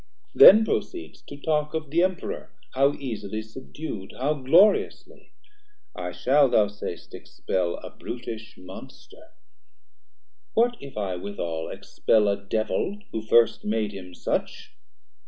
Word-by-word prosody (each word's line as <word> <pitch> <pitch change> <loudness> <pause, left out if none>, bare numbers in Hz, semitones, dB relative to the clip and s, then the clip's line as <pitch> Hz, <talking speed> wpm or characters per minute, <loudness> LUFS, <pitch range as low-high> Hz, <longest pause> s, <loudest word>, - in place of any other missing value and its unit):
then 220 +3 +9
proceed'st 350 - -4
to 145 - -9
talk 150 +1 -1
Of 155 -3 -4
the 170 +2 +3
Emperour, 185 0 -2 0.2
how 140 +2 +3
easily 110 -6 -5
subdu'd, 110 -2 -8
How 140 +4 +1
gloriously; 165 +9 +2 0.6
I 90 -1 -5
shall, 140 +5 +3
thou 105 -3 +3
say'st, 100 -4 -8
expel 90 -2 -3
A - - -10
brutish 115 -2 -8
monster: 90 +1 -13 1.2
what 240 +2 +3
if 140 -5 -11
I 95 -3 -2
withal 85 -4 -5
Expel 110 -2 +1
a 100 0 -2
Devil 110 - -2
who 110 - -3
first 115 +1 +3
made 105 -1 -1
him 90 -3 -10
such? - - -3
115 Hz, 125 wpm, -25 LUFS, 100-150 Hz, 1.2 s, then